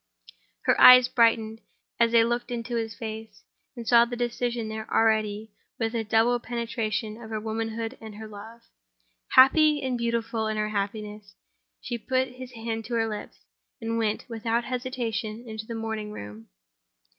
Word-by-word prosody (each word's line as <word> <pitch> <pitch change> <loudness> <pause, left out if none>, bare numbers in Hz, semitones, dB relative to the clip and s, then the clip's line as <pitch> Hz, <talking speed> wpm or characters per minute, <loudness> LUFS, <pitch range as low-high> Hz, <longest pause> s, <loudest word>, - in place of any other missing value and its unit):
Her - - +2
eyes 250 0 +10
brightened, 225 -2 +2 0.4
as 230 -1 +4
they 230 -1 +6
looked 240 +1 -1
into 240 0 -4
his 225 -2 -2
face 220 -1 -8 0.3
and 235 -2 -8
saw 235 0 +7
the 240 +1 -4
decision 240 -1 -2
there 220 0 -6
already, 220 -1 +1 0.3
with 225 -1 -1
the 230 -1 -2
double 225 +3 +2
penetration 230 -2 -3
of 220 - -9
her 220 -1 -3
womanhood 225 +1 -4
and 220 -2 -9
her 220 +1 -8
love. 215 +3 -11 0.7
Happy, 300 +3 +6
and 255 -2 -1
beautiful 230 -1 -1
in 215 0 -2
her 215 0 0
happiness, 210 0 -4 0.5
she 240 -1 -4
put 260 +3 0
his 250 0 -10
hand 225 -1 -4
to 235 - -3
her 225 -1 +1
lips, 210 -1 -8 0.3
and 230 0 -2
went, 215 -1 -1
without 230 0 -1
hesitation, 240 -3 -3
into 220 0 -7
the 230 - -5
morning 220 -1 -4
room. 105 - -9
225 Hz, 160 wpm, -26 LUFS, 220-240 Hz, 0.7 s, eyes